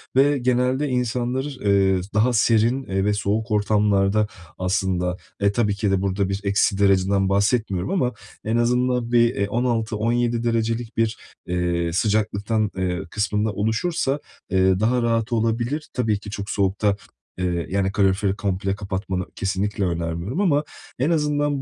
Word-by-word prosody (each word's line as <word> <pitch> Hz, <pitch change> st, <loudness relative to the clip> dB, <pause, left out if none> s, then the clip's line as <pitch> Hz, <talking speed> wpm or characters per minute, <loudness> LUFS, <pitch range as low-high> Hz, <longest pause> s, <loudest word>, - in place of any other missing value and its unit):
ve 140 Hz, +2 st, +4 dB
genelde 125 Hz, +3 st, +1 dB
insanlar, 125 Hz, +1 st, -1 dB
eee, 100 Hz, -9 st, +1 dB
daha 110 Hz, +4 st, +3 dB
serin, 115 Hz, +3 st, +3 dB
eee, 95 Hz, -3 st, -1 dB
ve 105 Hz, -, +2 dB
soğuk 105 Hz, +3 st, -1 dB
ortamlarda 105 Hz, 0 st, +2 dB, 0.3 s
aslında, 90 Hz, -1 st, 0 dB, 0.2 s
e, 100 Hz, 0 st, +3 dB
tabii 105 Hz, -1 st, +1 dB
ki 105 Hz, -1 st, 0 dB
de 95 Hz, -1 st, +1 dB
burada 95 Hz, 0 st, 0 dB
bir 95 Hz, +1 st, -2 dB
eksi 100 Hz, 0 st, +2 dB
dereceden 95 Hz, 0 st, +3 dB
bahsetmiyorum 100 Hz, -2 st, +1 dB
ama 130 Hz, -11 st, +1 dB, 0.3 s
en 110 Hz, +2 st, +1 dB
azından 125 Hz, 0 st, +1 dB
bir, 120 Hz, 0 st, +4 dB
eee, 100 Hz, 0 st, 0 dB
16-17 115 Hz, 0 st, 0 dB
derecelik 115 Hz, 0 st, -1 dB
bir, 115 Hz, 0 st, +1 dB, 0.3 s
eee, 85 Hz, -1 st, 0 dB
sıcaklıktan, 105 Hz, +2 st, 0 dB
eee, 90 Hz, -1 st, -1 dB
kısmında 105 Hz, +1 st, 0 dB
oluşursa, 135 Hz, -, 0 dB, 0.3 s
eee, 95 Hz, 0 st, +3 dB
daha 120 Hz, +4 st, +2 dB
rahat 115 Hz, -1 st, 0 dB
olabilir. 115 Hz, +6 st, -1 dB
Tabii 110 Hz, -5 st, 0 dB
ki 105 Hz, -, -9 dB
çok 100 Hz, -1 st, -5 dB
soğukta, 100 Hz, +1 st, +1 dB, 0.4 s
eee, 90 Hz, -2 st, -1 dB
yani 95 Hz, 0 st, 0 dB
kaloriferi 100 Hz, 0 st, +1 dB
komple 95 Hz, -1 st, -1 dB
kapatmanı 95 Hz, -2 st, -3 dB
kesinlikle 100 Hz, +1 st, -1 dB
önermiyorum 85 Hz, -, -2 dB
ama 150 Hz, -7 st, +3 dB, 0.4 s
en 140 Hz, -, +2 dB
azından 145 Hz, -3 st, +1 dB
105 Hz, 140 wpm, -23 LUFS, 95-120 Hz, 0.4 s, ve